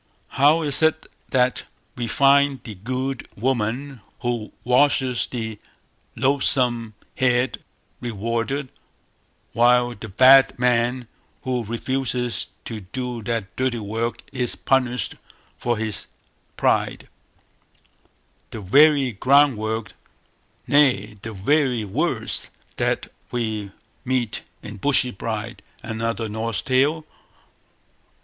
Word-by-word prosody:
How 150 +4 +4
is 145 0 +2
it 160 0 +2 0.2
that 125 -1 +1 0.3
we 120 -1 -3
find 140 +3 +3
the 110 - -7
good 130 +6 -4
woman 125 +2 -2 0.2
who 120 -3 -2
washes 130 0 +3
the 110 -4 -5 0.6
loathsome 125 -5 +1 0.2
head 125 0 +1 0.4
rewarded, 115 +4 -2 0.8
while 120 +1 +4
the 110 0 -9
bad 130 +6 +6
man 125 0 +1 0.4
who 125 -2 -1
refuses 125 +1 -2 0.2
to 115 -2 -5
do 120 +5 -5
that 110 -3 -3
dirty 130 -2 0
work 115 +2 -3
is 125 -2 -1
punished 125 -2 0 0.4
for 120 -1 0
his 110 -2 -3 0.5
pride; - - 0 1.4
the 110 - -7
very 140 +6 +5
groundwork, 115 -2 +2 0.7
nay 125 -8 +3
the 115 - -6
very 125 +2 +1
words, 100 - -2 0.3
that - - -1 0.2
we 110 -4 -3 0.3
meet 125 -4 -1 0.2
in 105 0 -8
Bushy 130 +2 +3
bride, 110 +2 -5 0.2
another 115 0 -3
Norse 110 +1 -3
Tale? 145 +4 +1
120 Hz, 100 wpm, -23 LUFS, 110-130 Hz, 1.4 s, bad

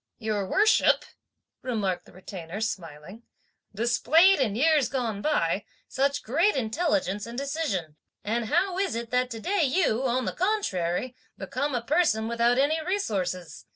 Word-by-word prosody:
"Your 215 -3 -2
worship," 430 +2 +4 0.6
remarked 210 -8 -2
the - - -17
Retainer 185 0 -8
smiling, 185 -1 -5 0.5
"displayed, 285 - +4
in 220 -7 +1
years 300 +1 +3
gone 230 -6 -2
by, 200 - 0 0.2
such 280 +2 0
great 335 - +2
intelligence 230 - -1
and 235 +1 -8
decision, 265 - -3 0.3
and 230 +2 -1
how 370 - +1
is 390 -9 0
it 235 0 -5
that 250 0 +1
today 340 - -1
you, 275 -5 +2
on 255 +1 0
the - - -2
contrary, 250 - -1 0.2
become 285 -2 -3
a 240 - -2
person 250 -6 +2
without 235 +1 +2
any 310 +4 +2
resources! 195 - -3
240 Hz, 140 wpm, -26 LUFS, 205-305 Hz, 0.6 s, worship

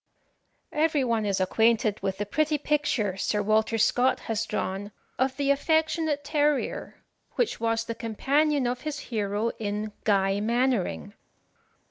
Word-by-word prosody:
Every 305 -2 +2
one 230 -4 0
is 195 -1 0
acquainted 215 +2 +2
with 190 -1 -2
the 205 - -2
pretty 305 +7 +1
picture 280 -10 0
Sir 205 +1 0
Walter 220 +2 +2
Scott 245 +4 +2
has 225 0 -2
drawn 195 +2 -3 0.3
of 260 0 +1
the 280 -1 +2
affectionate 315 0 +1
terrier, 295 -1 -1 0.3
which 485 - 0
was 225 0 0
the 230 - -3
companion 275 +6 +1
of 245 +1 -2
his 305 -1 -4 0.2
hero 210 +1 0
in 210 0 -3
"Guy 195 -1 +2
Mannering." 225 - 0
230 Hz, 135 wpm, -27 LUFS, 210-285 Hz, 0.3 s, Every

